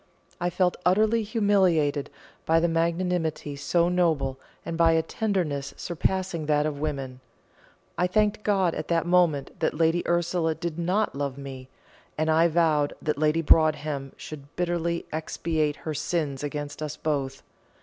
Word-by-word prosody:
I 175 0 0
felt 180 0 +1
utterly 215 +5 +3
humiliated 190 - +2 0.4
by 165 - +4
a 165 +1 +3
magnanimity 165 -2 -1
so 170 +4 +1
noble, 160 -7 +1 0.3
and 165 - -3
by 165 0 +4
a 160 0 +2
tenderness 170 -12 -2
surpassing 175 -1 -2
that 150 -1 +2
of 150 -2 -3
women. 135 -4 -4 0.8
I 180 - +3
thanked 210 +2 +1
God 195 -5 +2
at 155 - -5
that 170 -1 +1
moment 175 -6 +2
that - - 0
Lady 165 +2 +2
Ursula 170 -1 +1
did 170 0 -4
not 185 +5 +1
love 140 -1 -3
me, 135 -2 -8 0.5
and 155 +1 +1
I 165 +2 +5
vowed 155 -3 +2
that 150 -2 -2
Lady 155 +2 +2
Broadhem 150 -3 +2
should 145 -2 -10
bitterly 170 -1 -1
expiate 155 -1 -1
her 155 - -5
sins 145 -2 -2
against 145 0 -5
us 150 -1 -4
both. 135 -3 -2
160 Hz, 150 wpm, -26 LUFS, 145-175 Hz, 0.8 s, I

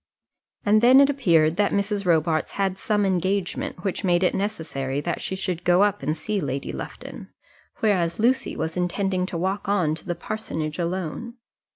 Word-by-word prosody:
And 215 +1 +4
then 255 +3 +7
it 280 0 +6
appeared 170 - +3
that 205 -1 +2
Mrs. 200 -1 -1
Robarts 160 -1 +1
had 195 -1 -1
some 210 -2 +1
engagement 185 -1 -1
which 195 -3 -2
made 175 -1 +2
it 180 - +3
necessary 155 -9 -3
that 170 +3 -3
she 190 - -3
should 180 -2 -3
go 180 +2 +4
up 205 -1 +1
and 155 +1 -1
see 205 +5 -2
Lady 135 -2 -3
Lufton, - - -8 0.5
whereas 180 -6 +1
Lucy 250 +4 +1
was 160 +1 -3
intending 185 +1 -1
to 175 - -4
walk 190 +3 -2
on 180 -7 +2
to 160 - -8
the 175 - -1
parsonage 160 -8 -4
alone. 185 +7 -3
185 Hz, 175 wpm, -24 LUFS, 165-205 Hz, 0.5 s, then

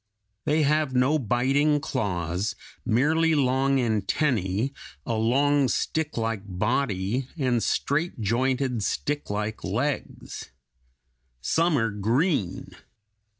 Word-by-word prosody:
They 155 +1 +2
have 150 -2 +1
no 135 +5 +3
biting 135 +5 +2
claws, 90 - -2 0.3
merely 155 +8 +2
long 135 0 +2
antennæ, 110 - 0 0.3
a 115 - -1
long, 135 +5 +3
sticklike 115 -6 -1
body, 105 +3 -1
and 125 -5 +1
straight 150 +5 0
jointed, 125 +3 0
sticklike 105 -4 -2
legs. 125 +9 -3 0.9
Some 160 - +2
are 115 -3 +1
green. 110 - 0
125 Hz, 90 wpm, -26 LUFS, 110-145 Hz, 0.9 s, no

